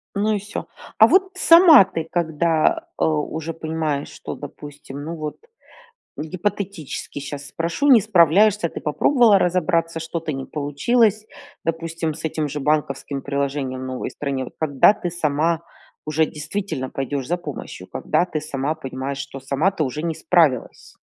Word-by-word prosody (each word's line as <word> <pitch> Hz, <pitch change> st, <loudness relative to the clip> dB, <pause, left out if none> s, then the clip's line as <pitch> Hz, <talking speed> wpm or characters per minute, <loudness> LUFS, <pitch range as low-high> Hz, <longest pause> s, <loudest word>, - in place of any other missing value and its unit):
Ну 210 Hz, +2 st, +1 dB
и -, -, 0 dB
всё. 205 Hz, +1 st, -6 dB, 0.3 s
А 220 Hz, -, +9 dB
вот 375 Hz, +8 st, +3 dB
сама 335 Hz, -, +8 dB
ты 165 Hz, -4 st, -5 dB
когда, 165 Hz, -1 st, +1 dB
э, -, -, +3 dB
уже 160 Hz, +1 st, -2 dB
понимаешь, 155 Hz, -3 st, -2 dB
что, -, -, -7 dB
допустим 145 Hz, -1 st, -9 dB
ну 165 Hz, +2 st, -5 dB
вот, 155 Hz, -1 st, -5 dB, 0.8 s
гипотетически 185 Hz, -2 st, -4 dB
щас 140 Hz, 0 st, -7 dB
спрошу, 170 Hz, +12 st, -2 dB
не 250 Hz, -5 st, +8 dB
справляешься. 185 Hz, +3 st, +4 dB
Ты -, -, -7 dB
попробовала 220 Hz, -, +4 dB
разобраться, 170 Hz, -2 st, +1 dB
что-то 165 Hz, -1 st, -4 dB
не 135 Hz, -1 st, -5 dB
получилось, 210 Hz, -, +1 dB, 0.4 s
допустим, 165 Hz, 0 st, -2 dB
с 155 Hz, -, -11 dB
этим 155 Hz, -1 st, -1 dB
же 145 Hz, +1 st, -4 dB
банковским 140 Hz, -1 st, -1 dB
приложением 140 Hz, -2 st, -2 dB
в -, -, -5 dB
новой 130 Hz, 0 st, -4 dB
стране. 140 Hz, -2 st, -3 dB
Вот -, -, -11 dB
когда 145 Hz, +3 st, +4 dB
ты 180 Hz, -4 st, -4 dB
сама 160 Hz, 0 st, 0 dB, 0.4 s
уже 155 Hz, +1 st, +1 dB
действительно 155 Hz, -3 st, -4 dB
пойдешь 135 Hz, 0 st, -3 dB
за 175 Hz, -, +1 dB
помощью, 175 Hz, -, -8 dB
когда 175 Hz, -, 0 dB
ты 155 Hz, -3 st, -3 dB
сама 150 Hz, 0 st, -2 dB
понимаешь, 135 Hz, -2 st, -5 dB
что 135 Hz, -1 st, -7 dB
сама 140 Hz, +7 st, +1 dB
ты 185 Hz, -5 st, -1 dB
уже 150 Hz, +3 st, -4 dB
не 165 Hz, -1 st, -1 dB
справилась? 160 Hz, -7 st, +1 dB
160 Hz, 155 wpm, -22 LUFS, 145-180 Hz, 0.8 s, А